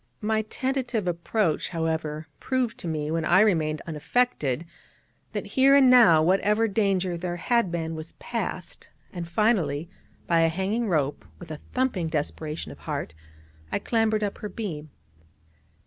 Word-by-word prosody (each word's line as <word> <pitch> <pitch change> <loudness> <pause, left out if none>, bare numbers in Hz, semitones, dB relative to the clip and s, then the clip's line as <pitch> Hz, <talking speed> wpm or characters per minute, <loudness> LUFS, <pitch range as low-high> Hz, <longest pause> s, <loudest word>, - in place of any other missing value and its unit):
My 220 +1 +1
tentative 250 -2 -2
approach, 170 0 0
however, 160 -2 -2
proved 255 -3 -1
to - - -6
me, 155 -1 -2
when 165 0 0
I 175 +4 +5
remained 160 -7 +2
unaffected, 160 - 0 0.7
that, - - -3
here 270 +1 +4
and 265 -2 +7
now, 175 -11 +7
whatever 210 +5 +3
danger 195 -4 0
there 175 0 -3
had 235 +1 +1
been 165 -1 -2
was 160 0 -7
past; - - -5 0.2
and 170 -2 -5
finally, 170 -6 +1 0.3
by 165 -1 +3
a 165 - +4
hanging 200 +7 -1
rope, 150 -5 0
with 170 -2 -10
a 155 - -6 0.2
thumping 250 -10 0
desperation 155 0 -3
of - - -12
heart, 80 - -4 0.6
I - - +1
clambered 220 -2 +1
up 205 - -3
her 210 - -5
beam. 170 -8 -5
175 Hz, 145 wpm, -26 LUFS, 160-220 Hz, 0.7 s, and